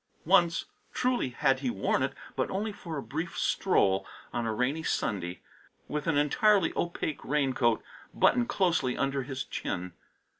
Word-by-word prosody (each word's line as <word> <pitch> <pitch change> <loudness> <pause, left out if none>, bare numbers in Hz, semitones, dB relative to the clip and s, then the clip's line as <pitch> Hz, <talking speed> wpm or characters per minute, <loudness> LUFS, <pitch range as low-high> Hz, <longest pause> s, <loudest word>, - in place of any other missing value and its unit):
Once, 175 -1 +4 0.3
truly, 250 - +1
had 135 +1 +2
he 130 -2 -1
worn 100 -5 0
it, - - 0 0.2
but - - 0
only 210 +3 -2
for 165 -6 -6
a 140 - -4
brief 165 +4 -4
stroll 100 - +2 0.3
on 120 -1 -1
a - - 0
rainy 130 +8 0
Sunday, 90 - -2 0.5
with 150 +1 -3
an 160 -3 +2
entirely 185 +6 +3
opaque 170 -3 -2
raincoat 130 -5 +1 0.3
buttoned 245 -1 +3
closely 175 - +1
under 135 0 0
his 130 0 -4
chin. 90 0 -4
145 Hz, 150 wpm, -29 LUFS, 125-175 Hz, 0.5 s, Once